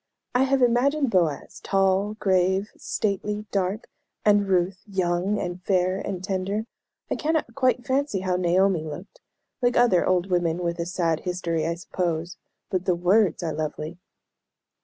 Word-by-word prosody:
I 250 +2 +4
have 270 -1 +2
imagined 260 +3 +2
Boaz 170 -7 0
tall, 195 +2 +1
grave, 190 0 +1
stately, 210 +1 -2
dark; 195 +2 -1 0.4
and 205 -1 +4
Ruth 185 0 +1
young, 185 +1 0
and 175 0 -4
fair, 185 0 +1
and 185 -3 -4
tender. 195 +2 -2 0.5
I - - +2
cannot 315 0 -1
quite 255 -2 +1
fancy 265 -7 0
how 185 -1 0
Naomi 180 -1 +2
looked 160 +6 -9 0.4
like 245 0 +2
other 240 -8 +4
old 185 0 +1
women 175 -1 +1
with 170 0 -2
a 170 - -2
sad 170 -3 0
history, 170 -3 -2
I 170 - -1
suppose 170 0 -3 0.3
but 185 -1 -1
the 180 - +2
words 180 +1 +2
are 160 -2 -2
lovely." 155 +2 -4
185 Hz, 150 wpm, -25 LUFS, 175-210 Hz, 0.5 s, I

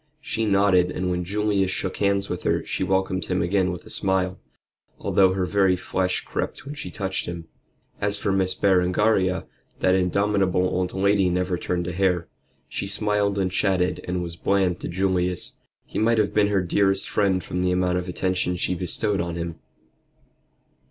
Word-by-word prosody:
She 115 -6 -2
nodded, 100 -3 +4
and 90 0 -2
when 90 0 -1
Julius 100 0 0
shook 95 0 -2
hands 100 -1 +1
with 90 - -4
her - - 0
she - - -2
welcomed 95 0 0
him 90 -1 0
again 90 +1 +1
with 90 - -7
a - - -5
smile, 95 -2 0 0.6
although 95 -1 +3
her 95 -1 0
very 95 -1 +3
flesh 90 +1 -2
crept - - -4
when 145 - -6
she 150 +1 -6
touched 95 -2 -3
him. 85 -1 -6 0.5
As 100 0 0
for 100 - -1
Miss 95 -1 +1
Berengaria, 95 0 +2 0.3
that 95 - +2
indomitable 95 0 +1
old 90 0 -1
lady 100 -1 +2
never 90 +1 0
turned 90 0 -2
a 90 - -3
hair. 90 -1 +1 0.4
She 100 - -4
smiled 100 0 +1
and 95 -2 0
chatted, 95 -2 0
and 90 0 -1
was 85 -1 -5
bland 90 0 +1
to - - -5
Julius. 90 -1 +1 0.3
He - - -4
might 115 +2 +3
have 105 -1 +1
been 105 -1 +3
her 100 -3 +1
dearest 95 +2 +2
friend 95 -3 +1
from 90 +2 -3
the 90 - +1
amount 90 0 +1
of 90 0 -6
attention 90 0 -1
she 90 - -1
bestowed 95 +3 0
on 85 0 -4
him. 85 -1 -5
95 Hz, 180 wpm, -24 LUFS, 90-100 Hz, 0.6 s, nodded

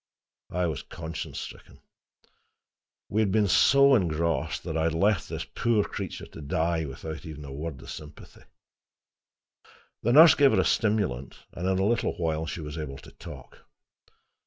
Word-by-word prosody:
I 90 0 0
was 80 -5 -2
conscience 80 +1 -7
stricken. - - -10 1.3
We 110 - +1
had 100 -3 +1
been 105 0 +3
so 140 +8 +6
engrossed 80 - 0
that - - -4
I 80 0 +1
had 80 -1 0
left 100 +2 +1
this - - -4
poor 115 -3 +1
creature - - -6
to - - -11
die 80 +3 0
without 80 +4 -7
even 75 -3 -8
a 70 - -8
word 75 -1 -5
of - - -8
sympathy. 75 -1 -11 1.6
The 120 - +1
nurse 160 +4 +9
gave 140 -2 +4
her - - +3
a - - +2
stimulant, 100 - 0
and 90 +2 -4
in 95 - +1
a 95 - +1
little 115 +2 +1
while 80 -1 -1
she 85 - -5
was 75 +1 -6
able 70 -3 -5
to - - -13
talk. - - -12
85 Hz, 165 wpm, -27 LUFS, 75-105 Hz, 1.6 s, nurse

